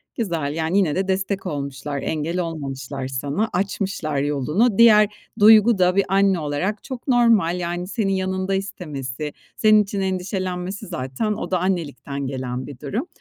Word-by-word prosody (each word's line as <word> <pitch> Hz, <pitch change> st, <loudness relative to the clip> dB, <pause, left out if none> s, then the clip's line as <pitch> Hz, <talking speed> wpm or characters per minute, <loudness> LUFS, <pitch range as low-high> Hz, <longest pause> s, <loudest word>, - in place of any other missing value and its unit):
Güzel. 165 Hz, -10 st, -2 dB
Yani, 165 Hz, +3 st, 0 dB
yine 175 Hz, -7 st, +2 dB
de 190 Hz, +1 st, -1 dB
destek 190 Hz, +1 st, -1 dB
olmuşlar, 140 Hz, -1 st, -4 dB
engel 160 Hz, +5 st, -2 dB
olmamışlar 140 Hz, -5 st, -4 dB
sana, 140 Hz, +11 st, -2 dB
açmışlar 190 Hz, -5 st, -2 dB
yolunu. 150 Hz, -, +1 dB
Diğer 215 Hz, -3 st, +7 dB, 0.3 s
duygu 215 Hz, +1 st, +7 dB
da 180 Hz, 0 st, +3 dB
bir 200 Hz, -, +3 dB
anne 195 Hz, -1 st, +3 dB
olarak 160 Hz, +8 st, -2 dB
çok 260 Hz, -1 st, -7 dB
normal. 225 Hz, -8 st, +3 dB
Yani, 175 Hz, +1 st, -3 dB
senin 200 Hz, -2 st, -1 dB
yanında 190 Hz, 0 st, -1 dB
istemesi, 150 Hz, -7 st, -5 dB, 0.2 s
senin 215 Hz, -1 st, +5 dB
için 200 Hz, 0 st, -4 dB
endişelenmesi 185 Hz, 0 st, -3 dB
zaten 150 Hz, +7 st, -2 dB
o 210 Hz, -, -5 dB
da 185 Hz, -, +2 dB
annelikten 145 Hz, -6 st, -2 dB
gelen 130 Hz, -1 st, -4 dB
bir 140 Hz, -3 st, -10 dB
durum. 220 Hz, -, -3 dB
180 Hz, 150 wpm, -22 LUFS, 145-200 Hz, 0.3 s, Diğer